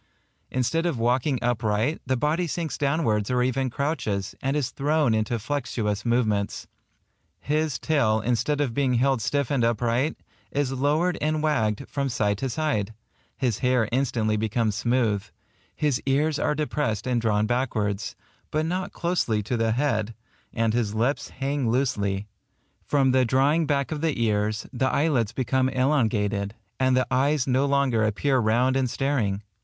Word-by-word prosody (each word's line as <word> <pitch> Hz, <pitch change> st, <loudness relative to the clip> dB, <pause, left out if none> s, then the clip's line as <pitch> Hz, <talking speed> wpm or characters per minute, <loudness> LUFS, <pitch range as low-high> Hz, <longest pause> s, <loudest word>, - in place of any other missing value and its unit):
Instead 165 Hz, +7 st, 0 dB
of 165 Hz, -7 st, -1 dB
walking 125 Hz, +4 st, +1 dB
upright, 115 Hz, +3 st, 0 dB
the 130 Hz, 0 st, +1 dB
body 155 Hz, +7 st, 0 dB
sinks 165 Hz, -1 st, -3 dB
downwards 140 Hz, -8 st, 0 dB
or 125 Hz, -1 st, +2 dB
even 130 Hz, +1 st, 0 dB
crouches, 115 Hz, -, -2 dB
and 135 Hz, +2 st, 0 dB
is 140 Hz, -5 st, -1 dB
thrown 145 Hz, -3 st, +1 dB
into 110 Hz, +2 st, 0 dB
flexuous 115 Hz, -4 st, -2 dB
movements; 110 Hz, -4 st, 0 dB, 0.7 s
his 150 Hz, -3 st, 0 dB
tail, 120 Hz, -8 st, +2 dB
instead 125 Hz, +6 st, 0 dB
of 130 Hz, -5 st, -1 dB
being 130 Hz, -1 st, +1 dB
held 130 Hz, 0 st, +2 dB
stiff 140 Hz, +5 st, -1 dB
and 135 Hz, -4 st, +1 dB
upright, 120 Hz, +5 st, +1 dB, 0.3 s
is 140 Hz, -2 st, -1 dB
lowered 150 Hz, +7 st, +1 dB
and 155 Hz, 0 st, 0 dB
wagged 110 Hz, -9 st, 0 dB
from 140 Hz, -1 st, -2 dB
side 105 Hz, -4 st, 0 dB
to 135 Hz, -, -2 dB
side; 115 Hz, -7 st, -1 dB, 0.4 s
his 120 Hz, -5 st, 0 dB
hair 125 Hz, -4 st, +2 dB
instantly 115 Hz, -4 st, +1 dB
becomes 110 Hz, 0 st, 0 dB
smooth; 110 Hz, -2 st, +1 dB, 0.5 s
his 145 Hz, -4 st, 0 dB
ears 145 Hz, +2 st, +2 dB
are 150 Hz, -, +1 dB
depressed 140 Hz, -7 st, -1 dB
and 125 Hz, -2 st, 0 dB
drawn 105 Hz, -2 st, +2 dB
backwards, 110 Hz, -3 st, -1 dB, 0.3 s
but 155 Hz, +1 st, 0 dB
not 180 Hz, +3 st, -2 dB
closely 165 Hz, -12 st, 0 dB
to 120 Hz, -, -2 dB
the 115 Hz, -1 st, +1 dB
head; 115 Hz, -4 st, 0 dB, 0.4 s
and 115 Hz, -1 st, 0 dB
his 110 Hz, -3 st, 0 dB
lips 120 Hz, +2 st, 0 dB
hang 135 Hz, -2 st, -2 dB
loosely. 105 Hz, -6 st, 0 dB, 0.6 s
From 135 Hz, -3 st, +2 dB
the 130 Hz, 0 st, +4 dB
drawing 140 Hz, +6 st, +2 dB
back 140 Hz, -1 st, 0 dB
of 150 Hz, -2 st, -3 dB
the 160 Hz, -6 st, 0 dB
ears, 105 Hz, -2 st, 0 dB
the 130 Hz, +1 st, +1 dB
eyelids 140 Hz, -8 st, +1 dB
become 130 Hz, +1 st, +1 dB
elongated, 110 Hz, -7 st, 0 dB, 0.2 s
and 130 Hz, -1 st, +3 dB
the 130 Hz, -, +2 dB
eyes 140 Hz, +1 st, +2 dB
no 130 Hz, +2 st, +2 dB
longer 140 Hz, -5 st, +2 dB
appear 130 Hz, +6 st, +1 dB
round 120 Hz, +4 st, +2 dB
and 130 Hz, -2 st, +1 dB
staring. 115 Hz, -8 st, -1 dB
125 Hz, 155 wpm, -25 LUFS, 110-145 Hz, 0.7 s, the